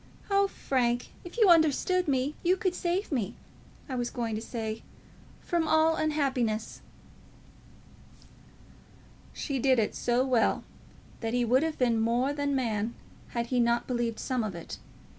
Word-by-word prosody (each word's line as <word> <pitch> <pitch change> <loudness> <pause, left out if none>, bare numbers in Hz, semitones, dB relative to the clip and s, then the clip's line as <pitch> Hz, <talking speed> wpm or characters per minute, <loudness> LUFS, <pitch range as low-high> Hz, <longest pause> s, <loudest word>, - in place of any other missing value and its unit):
Oh, 395 0 +4
Frank, 245 -8 -1
if 350 +5 -10
you 440 -4 +6
understood 335 +3 +3
me, 270 +1 +1
you 365 +2 +3
could 375 -4 0
save 360 +2 -1
me, 235 -9 -1 0.5
I 265 - -5
was 245 -1 -1
going 230 -2 -3
to 215 - -2
say 225 -2 -4 0.6
from 340 -3 0
all 315 +1 +4
unhappiness." 265 -9 -1 2.5
She 275 -3 -3
did 260 0 +3
it 220 -2 +1
so 245 +2 +1
well 250 -4 +2 0.6
that 225 +1 -2
he 245 -1 +2
would 255 +3 +4
have 320 -1 -1
been 235 -3 +2
more 240 +5 +1
than 285 -1 -1
man 225 -3 -1 0.4
had 235 - +1
he 250 - +3
not 235 0 +2
believed 240 -2 -1
some 255 -3 -1
of 205 -4 -4
it. 170 - -8
255 Hz, 150 wpm, -29 LUFS, 235-310 Hz, 2.5 s, you